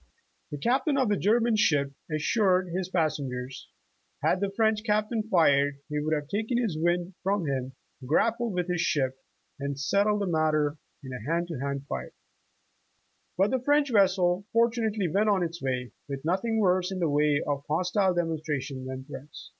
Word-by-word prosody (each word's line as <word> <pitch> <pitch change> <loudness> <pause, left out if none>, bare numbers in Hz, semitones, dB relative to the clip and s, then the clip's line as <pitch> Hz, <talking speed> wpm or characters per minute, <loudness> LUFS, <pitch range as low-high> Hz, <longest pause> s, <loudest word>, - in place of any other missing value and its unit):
The 145 - -5
Captain 265 - +1
of 260 -5 +2
the 205 - +3
German 225 +4 +2
ship 145 -9 +2 0.2
assured 185 +3 +2
his 180 +1 -3
passengers, 135 -7 -2 0.5
had 180 - +2
the 200 - +1
French 220 +1 +1
Captain 215 +1 +1
fired, 145 -6 +4
"he 150 0 -1
would 155 +1 0
have 150 -1 -4
taken 220 - -1
his 225 -9 0
wind 175 +3 0
from 195 -2 0
him, 135 -2 -2 0.3
grappled 230 - +1
with 180 -1 -1
his 175 -2 0
ship 135 -6 +1 0.4
and 140 0 -3
settled 205 +7 +2
the - - +1
mat 155 -3 +1
ter 150 0 0 0.2
in 130 -1 -7
a 125 +4 -5
hand 170 +1 0
to 160 - -4
hand 140 0 -3
fight." - - -5 1.2
But 195 +4 +3
the 260 - +1
French 290 +1 +2
vesseL 185 -3 +3
fortunately, 225 -4 +1
went 205 +6 +2
on 195 -3 +2
its 170 0 -4
way, 125 -2 -2 0.2
with 140 +1 -5
nothing 195 +7 0
worse 185 -2 +2
in 190 - -3
the 175 -2 +1
way 145 0 +2
of 145 -1 -1
hostile 180 +4 +1
demonstration 150 -6 -2
than 130 0 -6
threats. 145 0 -10
175 Hz, 175 wpm, -27 LUFS, 145-205 Hz, 1.2 s, fired